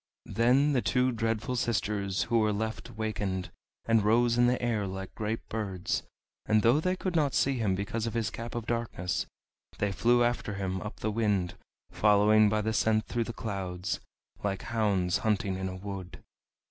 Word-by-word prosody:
Then 130 +6 +4
the 125 - +2
two 125 +1 +2
Dreadful 115 +2 -1
Sisters 105 -5 0
who 115 0 +2
were 110 -1 +2
left 110 +1 -3
wakened, 100 -4 -2 0.3
and 115 -2 +3
rose 115 +3 +3
in 120 0 +4
the 125 +1 +2
air 115 -4 0
like 95 0 -6
great 110 +1 -3
birds; 100 -5 -2 0.5
and 110 -1 +3
though 120 +6 +5
they 185 +3 0
could 185 -1 -3
not 145 -5 +2
see 135 -2 +2
him 100 -4 +1
because 110 +4 -2
of 115 - -4
his 115 -2 0
Cap 115 +1 -6
of 120 -2 -3
Darkness, 115 -6 -2 0.5
they 105 -1 0
flew 120 +4 +3
after 120 -4 -1
him 95 -1 -2
up 105 - -7
the 110 - 0
wind, 105 -5 0 0.4
following 105 0 +5
by 110 +1 +1
the 110 +1 -1
scent 110 0 +2
through 120 -1 -1
the 115 - -4
clouds, 95 -5 -3 0.4
like 100 -2 -2
hounds 100 -6 +1
hunting 100 -3 0
in 95 0 -3
a 95 - -6
wood. 95 -1 -7
110 Hz, 180 wpm, -29 LUFS, 100-115 Hz, 0.5 s, though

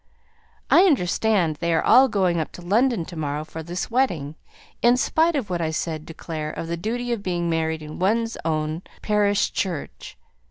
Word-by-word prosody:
"I 365 - +7
understand 195 - +2
they 170 +2 -1
are 165 - +2
all 265 +1 +7
going 185 -7 +1
up 155 - -3
to 175 - -10
London 220 0 +2
to 175 - -10
morrow 150 -1 -3
for 160 +1 -8
this 175 +7 -5
wedding, 175 - 0 0.5
in 240 +1 +5
spite 325 +5 +2
of 235 -9 -2
what 175 -1 -1
I 160 - 0
said 160 -1 -3
to 165 - -8
Clare 155 -2 -5
of 160 - -5
the 170 - -2
duty 240 +7 -3
of 235 -3 -1
being 175 -3 -1
married 160 -1 -1
in 150 0 -8
one's 225 +5 +1
own 155 0 -1 0.2
parish 205 -1 +2
church. 160 - -4
175 Hz, 190 wpm, -23 LUFS, 160-220 Hz, 0.5 s, I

